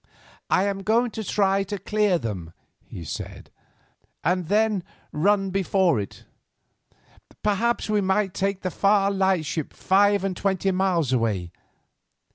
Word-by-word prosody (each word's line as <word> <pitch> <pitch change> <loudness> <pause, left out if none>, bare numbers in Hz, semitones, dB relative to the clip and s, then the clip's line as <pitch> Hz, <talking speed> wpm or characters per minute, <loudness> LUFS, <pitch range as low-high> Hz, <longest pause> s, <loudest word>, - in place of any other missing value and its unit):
"I 185 - +3
am 200 -1 -1
going 230 +4 +2
to 220 - -5
try 195 -1 +1
to 205 +1 -4
clear 205 -1 +1
them," 95 - -5 0.3
he 85 - -8
said, 75 - -7 0.7
"and 180 +1 0
then 210 -1 +2 0.3
run 195 +4 +1
before 190 - +2
it. 100 - -7 1.2
Perhaps 220 +3 +1
we 210 -1 +1
might 190 0 0
make 195 0 0
the 185 - -2
Far 200 +1 +3
Lightship 185 -6 0
five 200 +1 +3
and 195 -2 -1
twenty 195 0 0
miles 180 -7 +1
away. 105 -8 0
195 Hz, 130 wpm, -24 LUFS, 175-205 Hz, 1.2 s, I